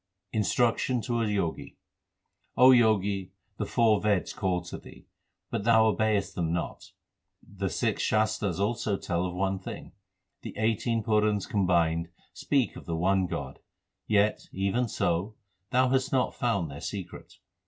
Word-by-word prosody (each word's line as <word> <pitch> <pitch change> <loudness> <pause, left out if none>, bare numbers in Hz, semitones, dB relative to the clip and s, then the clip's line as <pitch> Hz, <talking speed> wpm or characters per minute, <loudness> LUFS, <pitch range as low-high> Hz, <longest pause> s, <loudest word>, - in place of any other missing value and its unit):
Instruction 115 +4 +1
to 120 0 -1
a 115 - 0
Jogi: 100 -6 -2 0.8
O 130 +1 +8
Jogi, 105 -5 +2 0.2
the - - -3
four 110 -3 +3
Veds 105 -3 0
call 90 -2 0
to 90 - -8
thee, - - -15 0.5
but - - -2
thou 110 0 +5
obeyest 110 -2 +1
them 85 -2 -1
not; 85 0 -4 0.5
The 100 -1 -3
six - - -1
Shastars 110 -4 0
also 105 -1 0
tell 85 0 -2
of 90 - -6
one 95 0 -1
thing. 95 - -8 0.5
The - - -8
eighteen 115 +1 0
Purans 105 -2 +1
combined 85 -4 +1 0.2
speak 135 -4 0
of - - -11
the 85 -1 -2
one 95 +2 +2
God; 70 -4 -5 0.5
Yet, 105 0 +2
even 100 +6 0
so, 95 +1 -1 0.3
thou 130 0 +3
hast 130 +1 +1
not 130 -2 +1
found 100 - -1
their 70 - -9
secret. 100 -4 -7
100 Hz, 145 wpm, -28 LUFS, 90-115 Hz, 0.8 s, O